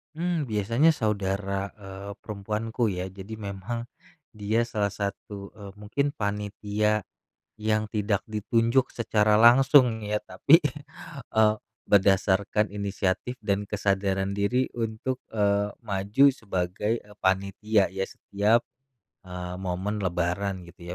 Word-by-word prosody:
Mmm, 170 -3 -1
biasanya 115 +9 +3
saudara, 100 -3 -2
eee, 100 -1 -9
perempuanku, 110 +3 -2
ya. 90 -2 -2
Jadi 100 +3 -8
memang 105 +3 -5 0.5
dia 110 +2 0
salah 105 -3 -1
satu, 100 0 -5
eee, 100 -2 -10
mungkin 115 +8 -2
panitia, 105 0 -1 0.5
yang 110 0 0
tidak 105 -2 0
ditunjuk 115 +4 +1
secara 105 -2 +2
langsung 125 -1 +6
ya, 105 0 0
tapi, 140 - +5 0.7
eee, 110 -1 +4 0.3
berdasarkan 100 +1 +3
inisiatif 100 +4 -2
dan 100 -2 0
kesadaran 100 -1 0
diri 120 +6 +1
untuk, 115 +3 -3
eee, 105 -1 +1
maju 100 +7 +2
sebagai, 100 +1 -2
eee, 105 0 -18
panitia 100 +2 +2
ya, 95 0 -3
setiap, 105 +4 0 0.6
eee, 90 -1 -6
momen 95 +3 -2
lebaran, 90 +1 -1
gitu 85 +1 -16
105 Hz, 110 wpm, -26 LUFS, 100-110 Hz, 0.7 s, langsung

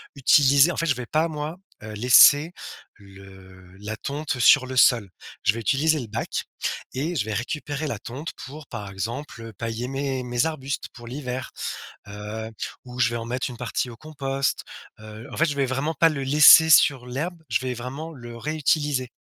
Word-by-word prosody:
utiliser 140 +3 +5
en - - -6
fait, 165 - 0
je 145 - +2
vais 125 -1 -7
pas, 155 +5 +1
moi, 155 +1 -5 0.2
heu, 110 0 -8
laisser 135 +7 +6 0.5
le 95 -2 -16
la 105 +1 -5
tonte 140 -1 -4
sur 125 +1 +6
le 130 0 -5
sol, 115 -7 +4 0.3
je 110 - +3
vais 115 - -5
utiliser 150 +6 +1
le 120 - -6
bac 110 +2 -3 0.5
et 155 +7 -3
je 110 - 0
vais 110 - -4
récupérer 145 +5 -4
la 115 -7 -4
tonte 135 +8 -7 0.2
pour, 145 +1 -11
par 100 -2 -7
exemple, 115 +3 -6
pailler 115 +3 -4
mes 135 -1 -3
mes 120 +3 0
arbustes 140 -4 -4
pour 120 -1 -12
l'hiver, 130 0 -5 0.6
heu, 105 +2 -7 0.4
où 125 0 -10
je 120 -1 +3
vais - - -3
en 115 - -6
mettre 125 +3 -3
une 120 - -9
partie 125 +1 -3
au 115 - -10
compost, 135 -1 -3 0.4
heu, 110 +3 -11
en - - -8
fait, 165 - +3
je 145 -3 -2
vais 140 -1 +1
vraiment 135 +5 -2
pas 165 +2 +4
le 140 -3 -4
laisser 150 +3 +8
sur 135 -5 +5
l'herbe, 160 +7 -4
je - - +1
vais 130 -1 -3
vraiment 135 +7 -7
le 120 -4 -10
réutiliser. 145 -2 -1
130 Hz, 190 wpm, -24 LUFS, 115-150 Hz, 0.6 s, laisser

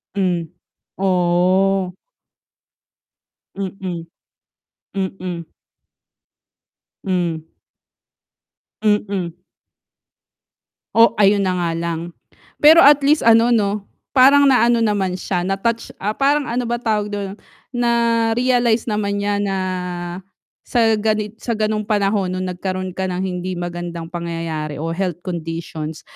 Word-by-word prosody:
Hmm. 180 -4 +1 0.5
Oh. 185 +1 +2 1.6
Mm. 185 -3 -5 0.9
Mm. 185 -3 -4 1.5
Hmm. 170 -4 -1 1.3
Mm. 200 -5 0 1.6
Oh, 230 0 +7
ayun 200 0 +4
na 185 -1 +1
nga 170 -1 0
lang. 170 0 -4 0.5
Pero 315 +2 +9
at 285 -2 +7
least 295 +2 +3
ano 230 +1 +6
'no 210 -3 +1 0.3
parang 280 +2 +7
na 250 -3 +5
ano 235 -1 +3
naman 200 -4 +1
siya 180 -1 -2
na-touch 210 +5 -2
ah, 210 +2 -1
parang 285 +1 +2
ano 245 +1 -1
ba 240 0 -2
tawag 210 -2 -1
do'n? 200 0 -4 0.4
Na-realize 235 0 +2
naman 205 -1 -1
niya 205 0 0
na, 200 -1 -1 1.1
sa 225 -2 +2
ganit 215 0 -1
sa 235 - -2
ganong 215 -1 -1
panahon 200 -2 0
nung 185 0 -3
nagkaroon 185 +1 -4
ka 190 - -1
ng 180 0 -3
hindi 185 0 -3
magandang 175 -1 -5
pangyayari 165 -3 -4
o 165 +1 -2
health 180 -1 -3
conditions 165 -3 -5
195 Hz, 110 wpm, -20 LUFS, 175-225 Hz, 1.6 s, Pero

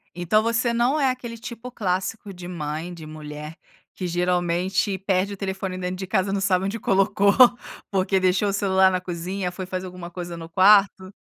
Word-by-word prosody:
Então 175 +5 +2
você 230 +1 +1
não 245 +6 +2
é 270 -2 +3
aquele 245 -2 -5
tipo 235 +2 -8
clássico 195 -1 -3
de 175 -1 -9
mãe, 160 0 -5
de 165 -2 -10
mulher, 150 0 -8 0.4
que 185 - -4
geralmente 180 +2 0
perde 190 +1 0
o - - -8
telefone 190 -1 -4
dentro 180 0 -3
de 190 0 -5
casa 190 0 +1
e - - -1
não 200 - -1
sabe 190 -1 +2
onde 205 +4 -3
colocou, 195 +1 +3 0.6
porque 190 0 +1
deixou 185 +2 +2
o 195 - -1
celular 190 -2 +3
na 185 -1 -1
cozinha, 180 +1 -4
foi 185 0 -6
fazer 185 0 -4
alguma 180 -1 -8
coisa 175 -1 -6
no 165 0 -8
quarto. 190 +1 +4
190 Hz, 190 wpm, -24 LUFS, 180-200 Hz, 0.6 s, quarto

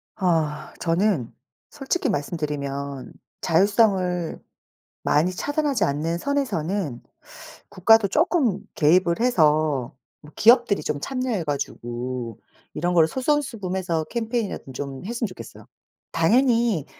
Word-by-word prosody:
아 160 -5 -1
저는 170 - 0 0.4
솔직히 290 +1 -2
말씀 165 -1 -2
드리면 140 -2 -4 0.3
자율성을 185 -2 +2 0.6
많이 155 +5 +2
차단하지 290 +1 0
않는 155 +4 -1
선에서는 195 - -2 0.7
국가도 205 +2 +4
쪼끔 270 - +1 0.2
개입을 170 +3 +3
해서 155 - +2 0.3
뭐 150 0 -14
기업들이 235 -2 +4
좀 150 -1 -2
참여해 255 -8 -2
가지고 125 -4 -4 0.4
이런 175 +2 -1
거를 160 -2 +5
솔선수범해서 200 - -1
캠페인이라도 225 - -3
좀 135 0 -6
했으면 235 +2 -2
좋겠어요. 185 - -11 0.5
당연히 230 - +2
180 Hz, 270 characters per minute, -23 LUFS, 150-230 Hz, 0.7 s, 거를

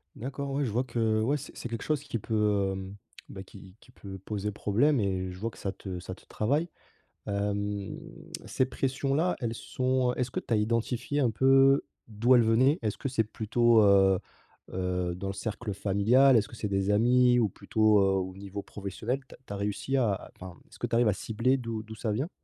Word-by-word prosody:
D'accord, 140 +3 -5
ouais, 140 +1 0
je 115 - -2
vois 125 +4 0
que 115 -2 0
ouais, 135 +6 +1
c'est 145 - -7
c'est - - -5
quelque 115 -1 -5
chose 150 -3 0
qui 130 -6 -4
peut, 105 -3 +1
hem, 95 +1 -6 0.3
bah, 95 - -8
qui 95 -1 -14
qui 125 - -19
peut 95 -4 -9
poser 105 +1 -4
problème, 115 +6 +2
et 95 -2 -1
je 90 - -8
vois 115 +3 -3
que - - -17
ça 95 0 -4
te 90 -2 -7
ça 95 +1 -7
te - - -20
travaille. 145 +10 -1 0.6
Hem, 100 0 -2 0.5
ces 130 - +1
pressions-là, 135 +6 0
elles 115 -1 -1
sont 130 +1 0
heu, - - -3
est-ce 125 -1 -1
que - - -2
tu 115 - -4
as - - +5
identifié 115 +5 -1
un 125 -5 +2
peu 135 +4 +5 0.2
d'où 115 +4 +2
elles 120 - +5
venaient? 125 +7 +3
Est-ce 105 -2 -2
que 135 - -3
c'est 115 -4 0
plutôt, 115 +1 +3
heu 95 -2 +5 0.5
heu, 90 -1 -2
dans 95 +2 -5
le 95 - -3
cercle 105 0 -4
familial? 115 +7 +4
Est-ce 105 - +1
que 120 - -12
c'est 105 -2 -4
des 95 +1 0
amis? 125 +3 +4
Ou 110 -4 +2
plutôt, 105 +2 +2
heu, - - +4
au 95 -1 -2
niveau 100 0 -6
professionnel? 105 +6 -4
Tu - - -13
as - - -22
tu - - -12
as 100 - -4
réussi 105 +7 -2
à 115 -6 +2
à - - -8
enfin, 90 -2 -9
est-ce - - -17
que - - -2
tu - - -1
arrives 120 -2 +4
à - - +2
cibler 115 +6 0
d'où 115 -3 -5
d'où 110 0 -10
ça 110 -1 -2
vient? 135 - -2
110 Hz, 220 wpm, -28 LUFS, 100-125 Hz, 0.6 s, as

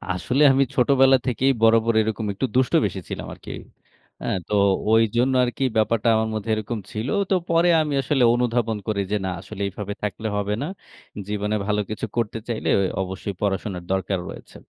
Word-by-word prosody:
আসলে 110 - +1
আমি 135 +1 +4
ছোটবেলা 135 +1 +5
থেকেই 130 +2 +2
বরাবর 115 0 +4
এরকম 110 0 -2
একটু 100 - -1
দুষ্ট 130 -1 +2
বেশি - - -3
ছিলাম - - -5
আরকি। - - -10 0.7
অ্যা - - -3 0.2
তো - - -4 0.4
ঐজন্য 115 +3 +3
আরকি 125 +2 -2
ব্যাপারটা 110 0 +1
আমার 110 0 0
মধ্যে 110 +1 -4
এরকম 110 +1 -4
ছিল। 110 +3 -4 0.2
তো 190 - +3
পরে 170 +1 +3
আমি 150 -2 -2
আসলে 135 -1 +1
অনুধাবন 120 -2 0
করি 105 -2 0
যে, 105 - +2
"না, - - -1
আসলে 105 -2 -9
এভাবে 105 +1 -6
থাকলে 105 +2 -3
হবে 105 0 -1
না। 145 - -2 0.6
জীবনে 105 0 -1
ভালো 105 0 +1
কিছু 110 - -3
করতে 115 -1 -1
চাইলে 115 -2 -2 0.3
অবশ্যই 95 +2 -4
পড়াশোনার 95 -2 -2
দরকার 95 0 -1
রয়েছে।" - - -11
110 Hz, 170 wpm, -23 LUFS, 105-125 Hz, 0.7 s, ছোটবেলা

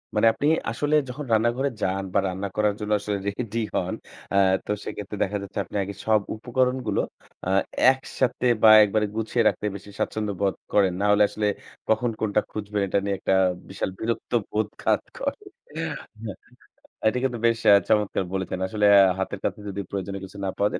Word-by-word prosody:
মানে 110 +2 +4
আপনি 145 +6 -1 0.2
আসলে 145 +5 0
যখন 140 +3 -6
রান্নাঘরে 120 +5 +2
যান 95 +1 0
বা 100 - +4
রান্না 95 +2 -3
করার 105 -1 +2
জন্য 105 0 -4
আসলে 105 0 -2
রেডি 115 +2 -3 0.2
হন - - 0 0.4
আ - - +1 0.3
তো - - -3
সেক্ষেত্রে 105 0 -6
দেখা 105 +2 -2
যাচ্ছে 100 0 -6
আপনি - - -12
আগে 100 +1 -6
সব 110 -1 +4 0.2
উপকরণগুলো 125 -1 0 0.4
আ - - -2 0.4
একসাথে 130 -1 -2 0.2
বা 110 - +9
একবারে 105 +1 +1
গুছিয়ে 115 +1 0
রাখতে - - 0
বেশি 100 +1 -10
স্বাচ্ছন্দ্যবোধ 100 -3 -1 0.2
করেন। 95 -3 +4
না - - +1
হলে 105 0 +5
আসলে 105 -1 -2 0.4
কখন 110 +2 +2
কোনটা 105 -1 +1
খুঁজবেন 105 -1 -3
এটা 100 - +1
নিয়ে 100 -1 0
একটা 95 - +1 0.4
বিশাল 95 - -3
বিরক্ত 115 +1 -3 0.2
বোধ 105 0 0
কাজ - - +2 0.2
করে। - - -2 0.4
হ্যাঁ, - - -3 1.1
এটা 120 - +2
কিন্তু 125 -3 0
বেশ 115 -1 +3
অ্যা 100 - +8 0.2
চমৎকার 105 -2 +2
বলেছেন! 95 -1 -2
আসলে 105 +1 0
আ - - +9 0.2
হাতের 95 +1 -3
কাছে - - -2
যদি 100 +1 -5
প্রয়োজনীয় 100 0 -4
কিছু 100 +2 -13
না - - 0
পাওয়া 100 +1 +2
যায় - - -3
105 Hz, 180 wpm, -25 LUFS, 100-115 Hz, 1.1 s, বা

